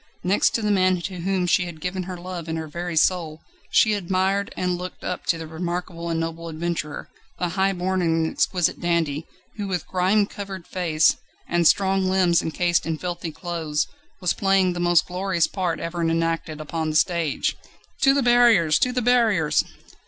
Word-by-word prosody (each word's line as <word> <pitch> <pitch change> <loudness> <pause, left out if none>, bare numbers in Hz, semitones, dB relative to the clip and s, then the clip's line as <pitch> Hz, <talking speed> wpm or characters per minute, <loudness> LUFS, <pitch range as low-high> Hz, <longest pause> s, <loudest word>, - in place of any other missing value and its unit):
Next 190 +3 +2
to 230 - -1
the 210 - +1
man 185 -2 +3
to 185 +1 -5
whom 185 +1 0
she 180 +1 +2
had 170 -3 -8
given 180 +3 -3
her 180 - -5
love 175 -1 -7
and 160 0 -2
her 160 -1 -4
very 170 +2 -5
soul 160 -2 +1 0.3
she 215 - +4
admired 195 +1 0
and 180 -1 0
looked 180 +1 -7
up - - -4
to 170 - +2
the 165 - -6
remarkable 170 +1 -4
and 165 -1 -1
noble 165 0 -4
adventurer, 160 -1 -4 0.3
the 180 - -1
high 190 +2 +1
born 185 0 -1
and 165 -1 +1
exquisite 175 +1 0
dandy, 165 -3 0 0.3
who 205 -1 -3
with 180 -4 -2
grime 190 +3 +2
covered 195 -3 -8
face, 165 -4 +2 0.3
and 170 -1 +3
strong 195 -1 +3
limbs 185 -3 +3
encased 175 +2 0
in 160 -1 -1
filthy 175 -1 -4
clothes, 160 -3 -2 0.4
was 180 - +1
playing 195 -2 +2
the 175 - -5
most 175 -1 +3
glorious 180 -1 0
part 180 -3 -2
ever 170 +1 -4
enacted 165 -1 -1
upon 155 +1 -3
the 155 - -3
stage. 170 -3 +1 0.5
"To 270 0 +5
the 280 - +2
barriers 235 -10 +5
to 250 -1 +2
the 250 -1 -1
barriers!" 220 -10 +3
175 Hz, 180 wpm, -23 LUFS, 165-190 Hz, 0.5 s, To